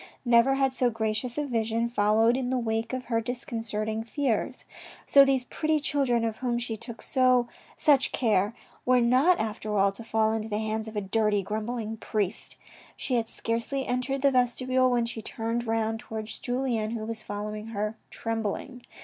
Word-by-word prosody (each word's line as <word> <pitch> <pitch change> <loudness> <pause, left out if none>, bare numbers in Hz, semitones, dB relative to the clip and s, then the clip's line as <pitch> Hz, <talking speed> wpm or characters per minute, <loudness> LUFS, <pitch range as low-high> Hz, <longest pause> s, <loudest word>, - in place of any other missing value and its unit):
Never 240 +3 +5
had 270 -1 +2
so 250 -1 +2
gracious 220 +2 -2
a 295 - 0
vision 230 -2 0
followed 225 +1 +3
in 255 -1 -1
the 260 - +1
wake 225 -1 -1
of 255 -1 -4
her 230 -1 0
discon 245 +1 -4
certing 220 0 -2
fears. 235 -1 -1 0.4
So 280 - +7
these 270 -2 +2
pretty 310 +4 0
children 270 -5 +1
of 225 -1 -2
whom 245 -2 -1
she 235 -1 -3
took 230 +1 -7
such 255 +2 +2
care 215 -2 +1 0.3
were 255 0 +4
not 255 +9 +4
after 215 -1 -2
all 195 0 +4
to 200 +4 -10
fall 220 -1 +1
into 220 0 -3
the 210 - -1
hands 220 0 -2
of 220 - -8
a 210 - 0
dirty 205 0 +1
grumbl 215 +5 -3
ing 220 0 -4
priest. 210 -2 -2 0.4
She 260 - -3
had 230 -2 +1
scarcely 235 +4 -2
entered 255 +2 -1
the 280 - +5
vestibule 255 +1 +2
when 240 -1 +2
she 230 -1 -5
turned 230 +2 -3
round 225 0 0
towards 220 -1 -6
Julien, 245 -4 -1
who 215 - -5
was 225 -1 -4
following 210 +1 -5
her 215 0 -3
trembling. 225 +3 -4
230 Hz, 180 wpm, -27 LUFS, 220-255 Hz, 0.4 s, So